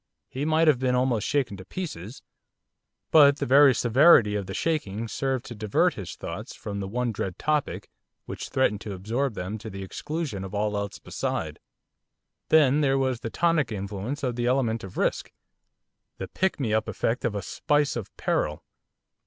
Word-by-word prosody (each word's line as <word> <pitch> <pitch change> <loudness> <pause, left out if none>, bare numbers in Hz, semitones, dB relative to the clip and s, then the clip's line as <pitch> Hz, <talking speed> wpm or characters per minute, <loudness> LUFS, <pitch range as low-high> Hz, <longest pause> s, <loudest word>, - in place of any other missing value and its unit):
He 135 +3 -3
might 160 +1 +3
have 145 -5 +5
been 130 -1 +1
almost 125 -4 +1
shaken 135 -8 0
to 95 - -9
pieces, 115 - -7 0.9
but 145 -2 +7
the - - -2
very 135 0 +6
severity 120 -2 +5
of 100 -2 -3
the 95 - -5
shaking 115 -9 -2
served 130 +1 -2
to 120 - -7
divert 105 -2 +1
his - - -7
thoughts - - -7
from 100 -1 -6
the 100 - -4
one 120 +3 -1
dread 95 -4 -4
topic 150 -1 -1 0.4
which - - -6
threatened 105 -6 +1
to 105 - -6
absorb 115 +6 -2
them 100 +4 -4
to 110 - -8
the 100 -1 -7
exclusion 145 - -4
of 95 +2 -7
all 105 0 0
else 100 -1 -3
beside. - - -4 0.9
Then 150 -2 +5
there 135 -2 +2
was 130 -3 0
the 115 - -5
tonic 165 -2 +1
influence 105 +7 -4
of 125 -3 -1
the 120 0 -1
element 120 -3 +1
of 95 - -9
risk. - - -1 0.9
The 95 - -5
pick 190 - -1
me 115 -6 -1
up 110 0 +1
effect 115 +3 -1
of 115 -4 -1
a 100 - -3
spice 145 +5 0
of 115 -5 -5
peril. - - -1
120 Hz, 180 wpm, -26 LUFS, 105-140 Hz, 0.9 s, but